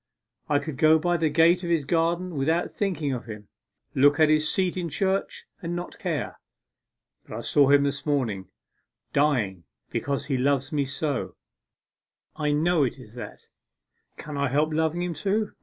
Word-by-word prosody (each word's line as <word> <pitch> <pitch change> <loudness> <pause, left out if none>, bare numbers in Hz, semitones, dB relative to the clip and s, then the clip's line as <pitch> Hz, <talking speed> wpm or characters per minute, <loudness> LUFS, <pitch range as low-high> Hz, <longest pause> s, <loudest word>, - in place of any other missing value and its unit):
I 145 - +3
could 145 -1 -4
go 155 0 +6
by 175 +2 +1
the 160 -1 +1
gate 170 +4 +4
of 170 - -3
his 165 -4 +1
garden 170 +3 0
without 160 +4 0
thinking 160 -9 -1
of 125 - -5
him 105 -2 -9 0.4
look 145 +2 +4
at 155 -1 +5
his 155 0 +3
seat 185 -2 0
in 175 -2 -3
church 190 +6 -1 0.2
and 170 -1 -3
not 175 0 -6
care. - - -3 0.9
But - - -7
I - - -4
saw 140 -2 +3
him 140 0 +6
this 140 0 -2
morning 120 - -1 0.7
dying 115 - +1 0.3
because 140 0 -2
he 135 -3 -1
loves 135 0 +1
me 145 -2 0
so 140 0 -3 1.0
I 150 -1 -1
know 160 +2 +2
it 130 0 -2
is 120 -5 -14
that! 120 - -9 0.7
Can 150 -1 -7
I 140 -1 +1
help 150 +4 +1
loving 160 +2 0
him 180 -1 -2
too? 200 +6 -1
150 Hz, 175 wpm, -26 LUFS, 140-170 Hz, 1.0 s, go